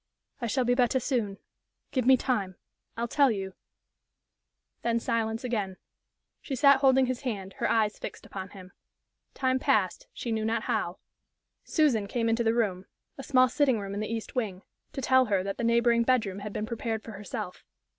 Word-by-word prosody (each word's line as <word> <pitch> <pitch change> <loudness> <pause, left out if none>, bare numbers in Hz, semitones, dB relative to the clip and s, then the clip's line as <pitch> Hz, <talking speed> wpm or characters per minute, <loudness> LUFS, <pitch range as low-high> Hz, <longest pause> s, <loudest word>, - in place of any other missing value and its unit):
"I 235 - -1
shall 250 +3 +1
be 245 - +3
better 250 +1 +2
soon. 225 -7 -1 0.5
Give 255 -3 0
me 260 0 +7
time. 205 -8 -1 0.4
I'll 235 +1 -1
tell 280 +3 +4
you 195 -4 -3 0.6
" - - -55
Then 235 0 +1
silence 225 0 -1
again. 210 -7 -2 0.6
She 275 - -4
sat 280 +2 +6
holding 265 -1 +5
his 255 -1 -3
hand, 200 -7 -4
her - - +1
eyes 215 -2 +1
fixed - - -7
upon 190 -1 -7
him. 185 -1 -12 0.6
Time 260 -1 +1
passed, 195 -7 +1
she 235 - -5
knew 220 -1 0
not 225 +1 0
how. - - -1 0.7
Susan 255 - +2
came 230 +2 0
into 225 +1 +1
the 225 0 +2
room 195 -5 0 0.3
a - - -5
small 255 -2 +4
sitting 260 -3 +2
room 200 -1 -5
in 205 - -3
the 215 +1 -3
east 225 -1 -4
wing 205 -6 -3 0.3
to 270 - -5
tell 260 0 +5
her 200 -4 +1
that 195 0 -4
the - - -1
neighboring 235 0 +3
bedroom 230 -6 +1
had 205 +1 -6
been 210 - -3
prepared 225 -1 -3
for 225 - -8
herself. 195 -3 -6
230 Hz, 185 wpm, -28 LUFS, 205-255 Hz, 0.7 s, me